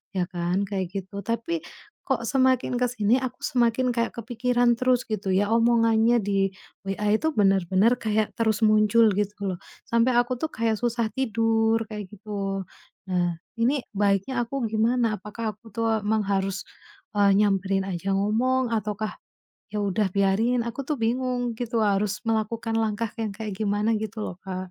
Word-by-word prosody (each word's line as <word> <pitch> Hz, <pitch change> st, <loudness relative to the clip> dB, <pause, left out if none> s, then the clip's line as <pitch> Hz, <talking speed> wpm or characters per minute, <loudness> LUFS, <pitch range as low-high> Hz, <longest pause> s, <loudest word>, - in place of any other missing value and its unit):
Ya 185 Hz, -, +1 dB
kan? 180 Hz, +2 st, -1 dB
Kayak 190 Hz, -2 st, -2 dB, 0.2 s
gitu. 200 Hz, +2 st, -8 dB
Tapi 230 Hz, +9 st, -1 dB, 0.5 s
kok 240 Hz, -4 st, 0 dB
semakin 260 Hz, 0 st, +2 dB
ke 250 Hz, -, 0 dB
sini, 220 Hz, -1 st, +2 dB
aku 255 Hz, -1 st, -5 dB
semakin 245 Hz, +1 st, +1 dB
kayak 235 Hz, -1 st, 0 dB
kepikiran 240 Hz, +1 st, +1 dB
terus 255 Hz, -1 st, +2 dB
gitu 205 Hz, -3 st, -2 dB
ya, 200 Hz, +2 st, +2 dB
omongannya 230 Hz, 0 st, +4 dB
di 195 Hz, -2 st, 0 dB, 0.3 s
WA 205 Hz, +2 st, +1 dB
itu 315 Hz, +8 st, 0 dB
bener-bener 195 Hz, -, +3 dB
kayak 215 Hz, -1 st, 0 dB
terus 220 Hz, -2 st, +1 dB
muncul 215 Hz, +1 st, +5 dB
gitu 205 Hz, 0 st, 0 dB, 0.2 s
loh, 185 Hz, -, -1 dB, 0.3 s
sampai 235 Hz, +2 st, +3 dB
aku 245 Hz, +1 st, 0 dB
tuh 310 Hz, +6 st, -3 dB
kayak 225 Hz, -1 st, 0 dB
susah 235 Hz, -1 st, 0 dB
tidur, 225 Hz, -2 st, +2 dB
kayak 210 Hz, -3 st, -7 dB
gitu. 200 Hz, -2 st, -4 dB, 0.4 s
Nah 175 Hz, -2 st, 0 dB, 0.2 s
ini 255 Hz, +3 st, +2 dB
baiknya 205 Hz, +5 st, +1 dB
aku 265 Hz, +2 st, -4 dB
gimana? 225 Hz, +1 st, +1 dB
Apakah 215 Hz, +1 st, -5 dB
aku 225 Hz, +2 st, -17 dB
tuh 230 Hz, +1 st, 0 dB, 0.2 s
emang 215 Hz, +1 st, +1 dB
harus, 195 Hz, -1 st, -1 dB, 0.5 s
eee, 200 Hz, -1 st, +5 dB
nyamperin 195 Hz, -1 st, +1 dB
aja 190 Hz, +1 st, -2 dB
ngomong, 245 Hz, +6 st, +1 dB
ataukah 215 Hz, 0 st, -3 dB, 0.6 s
ya 210 Hz, -1 st, -2 dB
udah 205 Hz, +1 st, +1 dB
biarin, 215 Hz, +5 st, +2 dB
aku 235 Hz, +4 st, -4 dB
tuh 300 Hz, -, 0 dB
bingung 245 Hz, +1 st, 0 dB
gitu 235 Hz, -2 st, -1 dB
harus 205 Hz, -1 st, 0 dB
melakukan 225 Hz, 0 st, -1 dB
langkah 220 Hz, 0 st, -1 dB
yang 215 Hz, -3 st, -3 dB
kayak 215 Hz, -1 st, -5 dB
gimana 210 Hz, +1 st, +1 dB
gitu 215 Hz, 0 st, -5 dB
loh, 180 Hz, -, -5 dB
Kak. 185 Hz, -1 st, -5 dB
220 Hz, 160 wpm, -25 LUFS, 200-235 Hz, 0.6 s, muncul